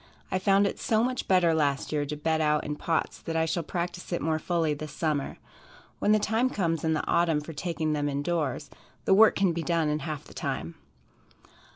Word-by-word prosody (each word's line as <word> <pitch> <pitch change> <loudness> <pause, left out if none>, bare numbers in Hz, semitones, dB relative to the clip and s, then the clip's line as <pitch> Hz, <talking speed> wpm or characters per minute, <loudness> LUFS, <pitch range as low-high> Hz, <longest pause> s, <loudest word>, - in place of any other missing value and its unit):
I 185 - +1
found 195 +1 +4
it 200 - -2
so 220 0 +2
much 255 0 -2
better 180 -3 +4
last 145 -3 0
year 145 -1 -1
to 150 - -3
bed 160 +1 0
out 150 -1 +2
in 150 - -3
pots 160 +2 -1
that 165 - -5
I 160 0 +2
shall 170 +2 -1
practice 175 +2 -4
it 175 - 0
more 160 0 0
fully 165 -2 0
this 150 0 -7
summer. 150 -4 -2 0.6
When 210 - +2
the 215 - +6
time 225 +4 +1
comes 165 -8 -1
in 160 0 +2
the 155 - -1
autumn 165 -3 +2
for 150 +2 -8
taking 160 -1 -2
them 145 -1 0
in 140 0 -2
doors, 150 -6 -2 0.3
the - - +4
work 220 +3 +6
can 195 -3 +2
be 170 - -2
done 165 -2 +1
in 150 0 0
half 155 -1 -5
the - - -14
time. 80 +2 -4
160 Hz, 220 wpm, -28 LUFS, 150-180 Hz, 0.6 s, the